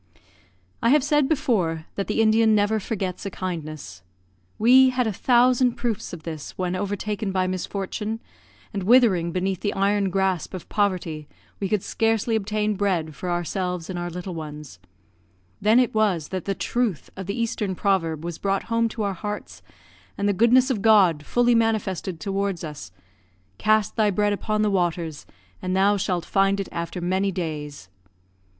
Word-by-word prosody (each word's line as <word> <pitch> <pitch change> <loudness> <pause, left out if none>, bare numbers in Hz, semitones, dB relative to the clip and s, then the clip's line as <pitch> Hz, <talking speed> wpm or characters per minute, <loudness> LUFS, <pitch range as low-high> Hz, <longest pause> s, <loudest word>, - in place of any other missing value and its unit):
I 230 - +3
have 290 +1 +5
said 295 -1 +2
before 185 - 0
that 195 - -3
the 225 - +2
Indian 220 0 +4
never 210 +1 +2
forgets 190 -3 -4
a - - -2
kindness. 155 - -6 0.6
We 255 +4 +6
had 250 -1 0
a 220 - -1
thousand 250 +3 +3
proofs 235 -4 -3
of 170 -3 -8
this, 155 -3 -7
when 180 -1 -1
overtaken 205 +1 -2
by 185 -1 +1
misfortune, 200 +4 -3 0.5
and 200 - -2
withering 195 -6 +4
beneath 185 +1 -1
the 205 - -2
iron 200 0 +2
grasp 190 -1 -1
of 185 - -8
poverty, 175 -7 -1 0.3
we 195 - -2
could 210 -2 0
scarcely 225 0 0
obtain 210 0 0
bread 185 -6 -1
for 180 +5 -5
ourselves 180 0 -2
and 175 - -4
our 175 0 -3
little 180 +2 -6
ones; 150 - -8 0.8
then 215 +3 +4
it 250 - +2
was 200 -8 +1
that 185 -3 -4
the 195 - -1
truth 235 -8 -2
of 190 -1 -7
the 200 +4 -3
eastern 210 -4 -1
proverb 165 -5 0
was 170 -2 -5
brought 195 -1 0
home 230 0 +2
to 220 -1 -4
our 200 -1 -1
hearts, 210 +3 -6 0.6
and 200 - 0
the 205 - +3
goodness 245 +6 +4
of 220 -6 -1
God 195 -8 +5
fully 245 0 +3
manifested 205 -6 0
towards 195 -1 -2
us, 145 - -7 0.7
"Cast 215 -2 +2
thy 215 -2 +3
bread 205 +1 +1
upon 215 +1 -1
the 210 - +2
waters, 170 -4 -1 0.3
and 185 0 -1
thou 200 +2 +4
shalt 185 -4 -1
find 195 0 +2
it 195 - -3
after 170 +1 -4
many 190 +3 0
days." 150 - -5
195 Hz, 170 wpm, -24 LUFS, 175-215 Hz, 0.8 s, We